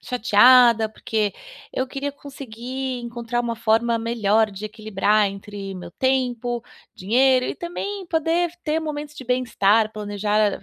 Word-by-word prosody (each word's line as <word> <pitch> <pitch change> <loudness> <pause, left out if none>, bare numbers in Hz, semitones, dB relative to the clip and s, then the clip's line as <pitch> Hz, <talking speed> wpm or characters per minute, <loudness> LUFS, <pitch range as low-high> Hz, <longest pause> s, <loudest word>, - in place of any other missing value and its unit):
chateada, 240 -1 +5
porque 215 -1 -2 0.4
eu 260 - -1
queria 275 +2 -4
conseguir 260 -2 -6
encontrar 235 0 -3
uma 235 -1 -3
forma 230 +1 +1
melhor 225 -2 +1
de 200 +1 -8
equilibrar 215 -1 +1
entre 200 0 -7
o - - -7
meu 175 -1 -9
tempo, 245 0 -1 0.3
dinheiro 255 +6 +3
e - - -3
também 380 +3 -5
poder 330 +1 0
ter 310 +1 0
momentos 300 -1 -5
de 265 - -8
bem-estar, 230 -4 +2
planejar, 210 -1 -1
235 Hz, 135 wpm, -22 LUFS, 215-260 Hz, 0.4 s, chateada